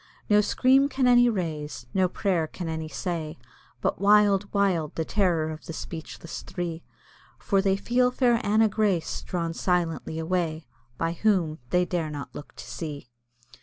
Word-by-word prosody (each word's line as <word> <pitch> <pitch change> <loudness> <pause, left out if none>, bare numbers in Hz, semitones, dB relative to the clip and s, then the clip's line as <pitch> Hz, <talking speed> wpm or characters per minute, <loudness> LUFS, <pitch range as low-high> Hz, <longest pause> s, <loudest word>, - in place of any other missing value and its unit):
No 210 0 +7
scream 265 +6 +3
can 265 -2 0
any 245 0 +6
raise, 155 - -3
no 185 -1 +2
prayer 175 -4 0
can 175 +2 -6
any 160 -1 -3
say, 160 -2 -4 0.4
But - - -1
wild, 205 -1 +4
wild, 185 -7 +1
the 160 - -1
terror 170 -6 +1
of 155 - -9
the 165 - -5
speechless 160 +1 -7
three 170 -2 -5 0.6
For 195 -2 +1
they 195 0 +2
feel 250 +5 +2
fair 250 -1 +2
Anna 215 +2 +4
Grace 200 -5 0
drawn 170 -3 -3
silently 170 -2 -1
away, 160 -2 -1 0.3
By 165 0 0
whom 170 -4 +1
they 180 0 +3
dare 170 -3 -2
not 145 -2 -7
look 145 - -10
to - - -9
see. 145 -6 -6
180 Hz, 160 wpm, -26 LUFS, 160-205 Hz, 0.6 s, No